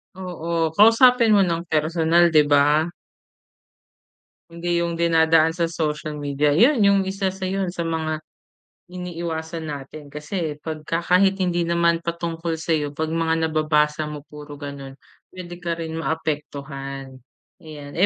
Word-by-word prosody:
Oo, 170 -3 -3
kausapin 230 +1 +6
mo - - +5
ng 170 0 -1
personal, 165 +2 +3
di 150 - +7
ba? 145 +1 +4 1.7
Hindi 170 +1 -1
yung 170 -1 -2
dinadaan 165 -1 +3
sa 170 -1 0
social 155 -2 -3
media. 145 0 0
Yun 245 - +5
yung 200 -1 +5
isa 195 0 -1
sa 190 0 -6
yun 190 -1 -1
sa 170 -2 -4
mga 155 -1 -2 0.7
iniiwasan 170 -2 -5
natin. 145 +1 -8
Kasi 150 0 -4
pagka 160 +1 -3
kahit 190 +2 +3
hindi 175 -1 +1
naman 170 0 +2
patungkol 170 -1 -3
sayo 155 -3 -1
pag 160 +1 -2
mga 165 0 0
nababasa 155 -1 +1
mo 150 -1 -7
puro 150 0 -10
ganun, 140 -2 -8 0.4
pwede 175 -1 -8
ka 170 -1 -2
rin 160 -1 -5
maapektuhan 140 -4 -5 0.4
ayan 150 -3 -10
160 Hz, 135 wpm, -22 LUFS, 150-175 Hz, 1.7 s, di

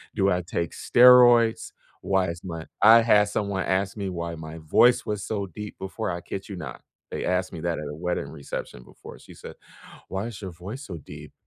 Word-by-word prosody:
do 100 -2 +2
I 90 0 +1
take 85 -1 -3
steroids, 120 -2 +5 0.3
why 95 -1 +1
is 85 0 -6
my 80 -3 -6 0.2
I 115 +2 +8
had 105 -3 +4
someone 100 -2 -2
ask 95 +2 -1
me 100 -2 -3
why 85 -2 -4
my 80 0 -9
voice 100 +10 +3
was 105 -2 -3
so 100 -3 -3
deep 105 +4 -9
before, 95 +4 -4
I 85 - -5
kid 95 +2 -7
you 100 - -6
not. 90 - -8 0.3
They - - -4
asked 90 0 0
me 85 - -6
that 85 -2 -2
at 75 - -6
a 75 - -6
wedding 90 -2 -3
reception 70 -4 -7
before. - - -13
She - - -15
said, - - -11 0.5
"Why 95 +4 -3
is 115 -3 -9
your 95 - -6
voice 95 - -8
so 90 -5 -7
deep?" 75 - -11
95 Hz, 210 wpm, -25 LUFS, 85-105 Hz, 0.5 s, I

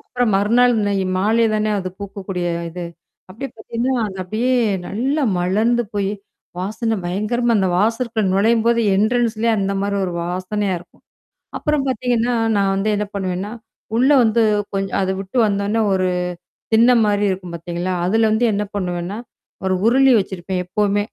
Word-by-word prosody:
அப்புறம் 245 -2 -1
மறுநாள் 235 +5 +3
இன்னை 205 -1 0 0.2
மாலை 220 +4 +3
தானே 215 0 0
அது 185 - -3
பூக்கக்கூடிய 195 -2 -5 0.2
அ - - -6
இது. 175 +1 -6 0.5
அப்டியே 265 +8 -6
பாத்தீங்கன்னா, 235 +4 -2
அது 190 -1 -8
அப்டியே, 230 +7 0 0.3
நல்லா 270 +8 -1 0.2
மலர்ந்து 220 +7 +2
போயி, 200 0 0 0.5
வாசனை 220 +4 -2
பயங்கரமா 215 +7 0
அந்த 190 -2 +2
வாசற்க்குள்ள 225 +2 0
நுழையும்போது, 230 +3 +3 0.2
என்ட்ரன்ஸ்லயே 230 +1 +1
அந்த 195 0 0
மாரி 200 0 -1
ஒரு 180 - -3
வாசனையா 185 +3 -2
இருக்கும். 175 - -20 0.6
அப்புறம் 300 -3 0
பாத்தீங்கன்னா, 245 -1 0 0.2
நான் 195 -1 +2
வந்து 195 +2 0
என்னா 205 0 -2
பண்ணுவேன்னா, 190 +1 -3 0.5
உள்ள 260 +4 +4
வந்து 225 +1 +2 0.3
கொஞ்ச 195 0 -1
அத 190 - 0
விட்டு 195 +6 -5
வந்தோன்னே 200 +2 0
ஒரு 185 -1 +1 0.7
திண்ண 235 +3 +6
மாரி 205 0 +1
இருக்கும் 180 -2 -4
பாத்தீங்களா? 175 +2 -3
அதுல 220 +4 +3
வந்து 230 +3 +2
என்னா 205 +1 -1
பண்ணுவேன்னா? 180 +2 -3 0.5
ஒரு 190 - +1
உருளி 265 +2 +5
வச்சிருப்பேன் 185 -1 -4
எப்பவுமே. 205 +1 +1
210 Hz, 150 wpm, -20 LUFS, 190-235 Hz, 0.7 s, திண்ண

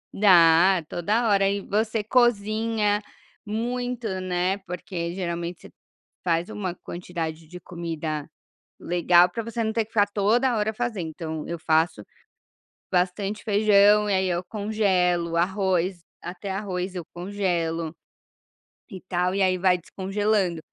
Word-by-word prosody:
Dá, 175 -2 +6
toda 215 +9 0
hora 195 -2 +3
e 200 - -1
você 215 +2 -1
cozinha 215 -2 +2 0.4
muito, 245 +2 -3
né, 185 +2 -1
porque 180 -2 -5
geralmente 170 -1 -4
você - - -13 0.5
faz 170 +2 0
uma 200 -5 -4
quantidade 165 -3 -6
de 180 +2 -10
comida 160 -4 -5 0.5
legal 175 0 +4
para 230 +6 -4
você 230 +1 -3
não 220 - 0
ter 225 -2 +1
que 215 - -26
ficar 205 -2 +4
toda 225 +5 +1
hora 215 0 0
fazendo, 220 -7 -3
então 160 -1 -6
eu 170 - -4
faço, 160 -7 +1 0.9
bastante 190 +3 -1
feijão 210 0 +4
e 200 - +2
aí 190 0 +1
eu 175 0 -1
congelo 190 -5 0
o 170 - -1
arroz, 185 0 +1 0.2
até 185 +3 -6
arroz 190 -1 -3
eu 180 -2 -5
congelo, 175 -4 -2 1.0
e 190 -5 -8
tal, 180 0 -1
e 200 - +2
aí 185 -1 +3
vai 180 -1 +3
descongelando. 195 -1 -1
190 Hz, 135 wpm, -25 LUFS, 175-210 Hz, 1.0 s, Dá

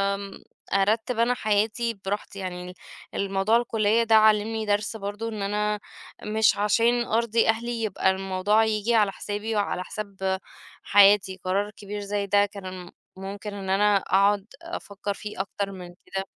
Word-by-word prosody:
آمم، 200 0 -9 0.3
أرتب 220 +4 +1
أنا 235 +2 +3
حياتي 220 +1 0
بِراحتي 200 0 -4
يعني، 180 -1 -6 0.4
الموضوع 195 +3 +2
الكلية 225 -1 +2
ده 225 -1 +4
علمني 220 0 +4
درس 205 +2 0
برضه 205 +2 -5
إن 215 -2 -5
أنا 210 +1 -1 0.4
مش 215 0 +2
عشان 230 +4 +2
أرضي 230 0 +1
أهلي 230 +1 -1
يبقى 190 -2 +1
الموضوع 195 +3 +1
ييجي 220 +1 +1
على 210 -3 +4
حسابي 210 +2 -4
وعلى 200 -3 -1
حساب 190 -2 -3 0.4
حياتي، 195 -1 +5
قرار 200 +3 0
كبير 205 0 -7
زي 200 0 -2
ده 205 +1 +4
كان 185 -3 -8 0.3
ممكن 200 +2 -6
إن 195 -2 -6
أنا 205 +1 +4
أقعُد 195 +1 +2 0.2
أفكر 205 - -5
فيه 210 -1 -5
أكتَر 200 0 -4
من 185 -2 -8 0.2
كده. 195 0 -4
205 Hz, 145 wpm, -25 LUFS, 195-220 Hz, 0.4 s, حياتي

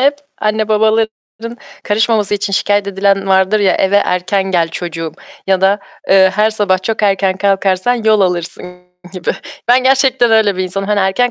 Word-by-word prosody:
hep 285 +2 +2 0.2
anne 215 0 -1
babaların 220 +1 -1 0.3
karışmaması 210 -1 +1
için 205 0 -3
şikâyet 205 +1 0
edilen 195 0 0
vardır 190 +2 +2
ya, 195 - +2
"Eve 195 +1 +1
erken 185 0 0
gel 170 -3 +1
çocuğum." 165 -1 -6 0.3
ya 190 -1 +1
da, 195 +2 +2 0.3
eee, 190 -1 +5
"Her 215 +2 +2
sabah 195 -3 0
çok 220 +2 -3
erken 195 -2 +1
kalkarsan 195 +3 0
yol 220 -3 +1
alırsın." 180 0 -3 0.3
gibi. 185 -3 -3 0.4
Ben 250 +1 +4
gerçekten 265 -2 +2
öyle 220 -3 +2
bir 185 - -1
insanım. 195 +2 -3
Hani, 210 -1 +1
erken 195 +6 +1
200 Hz, 165 wpm, -14 LUFS, 190-220 Hz, 0.4 s, eee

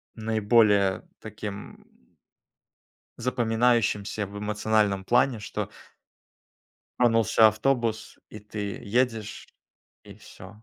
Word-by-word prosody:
наиболее 105 -3 +2 0.2
таким 105 -1 -9 1.3
запоминающимся 115 -4 0
в 100 +1 -9
эмоциональном 105 -2 0
плане, 120 -1 +2
что - - -5 1.3
тронулся 115 -2 +5
автобус, 115 0 -1
и 105 - -11
ты 105 -1 -6
едешь, 110 -1 -2 0.6
и - - -12
всё. 105 +2 -14
110 Hz, 80 wpm, -26 LUFS, 105-115 Hz, 1.3 s, тронулся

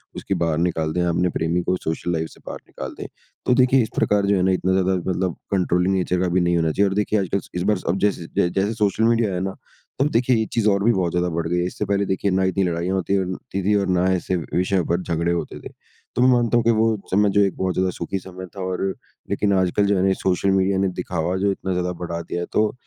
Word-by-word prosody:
उसकी - - -3
बाहर 80 -2 0
निकाल 80 -2 0
दें। 90 - 0
अपने 90 +1 +1
प्रेमी 85 +1 -1
को 90 - +1
सोशल 80 +2 -2
लाइफ़ 80 -1 -2
से - - -18
बाहर - - -6
निकाल 65 0 -7
दें। - - -5 0.4
तो - - +5
देखिए 130 +1 +4
इस 110 - -5
प्रकार 100 -1 +2
जो 100 - +3
है 90 - +1
ना 95 - +3
इतना 95 0 0
ज़्यादा 95 0 +2 0.2
मतलब 90 -1 -1 0.2
कंट्रोलिंग 90 0 +1
नेचर 90 -1 0
का 95 - +1
भी 90 +1 +2
नहीं 85 0 +2
होना 80 -1 +1
चाहिए। 100 +5 +2
और 95 - -3
देखिए 105 +1 +1
आजकल 100 0 -1
इस 90 - -1
बार 105 +1 +2
अब 90 - +1
जैसे 100 -5 0
जै 85 - +3
जैसे 100 +4 0
सोशल 105 0 +1
मीडिया 115 -1 +3
आया 95 - -3
है - - -2
ना? 95 0 -3 0.4
तो 135 - +3
अब - - +1
देखिए 120 -2 +2
एक - - -7
चीज़ 115 -2 +1
और 100 -1 +1
भी 115 - +5
बहुत 90 -3 0
ज़्यादा 90 +1 0
बढ़ 85 0 -1
गई 90 +1 0
है। 90 - 0
इससे 105 - -4
पहले 100 0 0
देखिए 95 +1 0
ना 95 +1 +2
इतनी 95 +1 +1
लड़ाइयाँ 90 +1 -1
होती 95 +1 0
और 95 - 0
होती 95 +1 -5
थी 105 - +3
और 95 -3 +1
ऐसे 95 0 0
विषयों 90 +3 0
पे 85 - +3
झगड़े 85 0 -1
होते 85 -4 -3
थे। - - -9 0.5
तो 125 - +1
मैं 125 - +6
मानता 120 -1 +3
हूँ 120 - +2
कि 115 - +5
वो 110 0 +2 0.2
समय 100 +2 +3
जो 100 +1 +3
है 100 - +4
एक 95 - -5
बहुत 95 -1 0
ज़्यादा 95 +1 +1
सुखी 90 +3 -4
समय 95 0 -9
था 95 - -6
और 95 0 -2 0.5
लेकिन 100 -1 +1
आजकल 95 +2 +2
जो 100 0 +2
है - - +1
ना 95 - +3
ये 95 - +3
सोशल 95 +1 0
मीडिया 95 0 +2
ने 95 - +2
दिखावा 90 0 -2
जो 100 - +3
इतना 95 0 -4
ज़्यादा 90 0 -1
बढ़ा 85 -1 -3
दिया 85 +1 -4
है - - -2
तो 105 0 +2
95 Hz, 280 wpm, -22 LUFS, 90-100 Hz, 0.5 s, मैं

